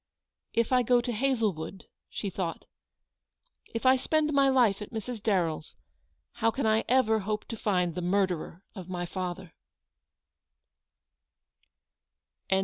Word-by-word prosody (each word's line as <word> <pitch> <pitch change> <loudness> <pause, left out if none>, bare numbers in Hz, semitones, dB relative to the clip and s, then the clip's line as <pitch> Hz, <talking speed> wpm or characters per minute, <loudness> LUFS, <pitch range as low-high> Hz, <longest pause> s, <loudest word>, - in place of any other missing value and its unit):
"If 230 +1 +1
I 255 -1 +5
go 245 +1 +4
to 240 0 -2
Hazlewood," 215 -8 -1 0.2
she 200 - -4
thought, 170 -3 -4 1.1
"if 230 +2 -4
I 260 0 +7
spend 305 +3 +1
my 275 -1 +5
life 235 -7 +3
at 210 - -6
Mrs. 225 0 -5
Darren" 180 -7 +1
s, 155 - -15 0.6
how 225 - +3
can 265 +3 -2
I 220 0 +3
ever 235 -4 +4
hope 210 +1 -3
to 230 - -3
find 180 -5 0
the 180 - -4
murderer 180 -1 -1
of 185 -3 -9
my 175 -1 -3
father 180 0 -5
215 Hz, 135 wpm, -29 LUFS, 185-245 Hz, 1.1 s, I